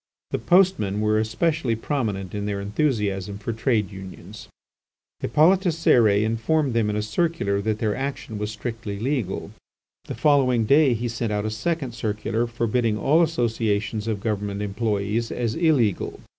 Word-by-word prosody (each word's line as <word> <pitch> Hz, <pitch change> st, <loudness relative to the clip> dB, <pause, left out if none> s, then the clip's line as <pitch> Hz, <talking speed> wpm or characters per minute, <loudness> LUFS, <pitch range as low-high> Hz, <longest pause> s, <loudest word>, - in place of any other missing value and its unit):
The -, -, -1 dB
postmen 175 Hz, -, +3 dB
were 110 Hz, 0 st, +2 dB
especially 130 Hz, +3 st, 0 dB
prominent 110 Hz, -, -3 dB
in 105 Hz, 0 st, -3 dB
their 100 Hz, -1 st, -2 dB
enthusiasm 100 Hz, -3 st, -1 dB
for 110 Hz, +3 st, -4 dB
trade 110 Hz, -3 st, 0 dB
unions. 95 Hz, +1 st, -10 dB, 0.7 s
Hippolyte 160 Hz, -, +4 dB
Cérès 115 Hz, -11 st, +3 dB
informed 115 Hz, +6 st, 0 dB
them 115 Hz, -2 st, +1 dB
in 105 Hz, -, -1 dB
a 105 Hz, -, -1 dB
circular 110 Hz, -, 0 dB
that 110 Hz, +1 st, -1 dB
their 110 Hz, -2 st, -1 dB
action 135 Hz, -5 st, -4 dB
was 105 Hz, 0 st, -2 dB
strictly 110 Hz, -1 st, -5 dB
legal. 120 Hz, -4 st, -2 dB, 0.5 s
The -, -, -6 dB
following 130 Hz, -6 st, +3 dB
day 140 Hz, 0 st, +4 dB
he 120 Hz, +2 st, -2 dB
sent 115 Hz, -1 st, -3 dB
out 105 Hz, 0 st, -1 dB
a 110 Hz, -, -2 dB
second 140 Hz, +3 st, -2 dB
circular 110 Hz, 0 st, -2 dB
forbidding 115 Hz, -1 st, 0 dB
all 150 Hz, +9 st, +3 dB
associations 115 Hz, -7 st, 0 dB
of 105 Hz, -3 st, -2 dB
government 105 Hz, -1 st, -2 dB
employees 105 Hz, +2 st, -1 dB
as 115 Hz, -2 st, -1 dB
illegal. 145 Hz, -, +1 dB
110 Hz, 150 wpm, -24 LUFS, 105-130 Hz, 0.7 s, Hippolyte